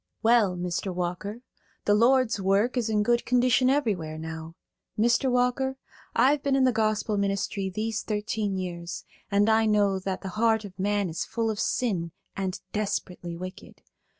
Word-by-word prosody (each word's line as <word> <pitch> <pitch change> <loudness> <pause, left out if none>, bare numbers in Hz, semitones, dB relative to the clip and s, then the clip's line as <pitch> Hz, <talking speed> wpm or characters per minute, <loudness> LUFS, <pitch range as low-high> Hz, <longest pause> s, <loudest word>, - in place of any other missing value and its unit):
"Well, 220 -5 +4
Mr. 180 +2 -2
Walker, 180 +6 -4 0.4
the 205 - +4
Lord's 235 -1 +3
work 200 +6 +2
is 235 -3 0
in 210 -1 +2
good 235 +2 +2
condition 250 +1 +3
everywhere 200 - 0
now. 160 +1 -7 0.4
Mr. 235 +4 +3
Walker, 250 +2 +1 0.4
I've 270 +5 +4
been 275 -1 +1
in 270 - +3
the 255 - +5
gospel 215 -1 0
ministry 195 0 -1
these 215 +3 -2
thirteen 210 -2 -2
years, 175 -1 -5 0.2
and 205 +1 +3
I 220 0 +4
know 205 -2 +3
that 190 0 -4
the 190 - -5
heart 220 +1 +1
of 195 -1 -12
man 205 0 +1
is 165 -1 -3
full 225 -1 -1
of 210 - -5
sin 180 -9 -1 0.2
and 190 -1 -3
desperately 180 -4 -3
wicked. 185 +1 -9
210 Hz, 160 wpm, -27 LUFS, 185-235 Hz, 0.4 s, the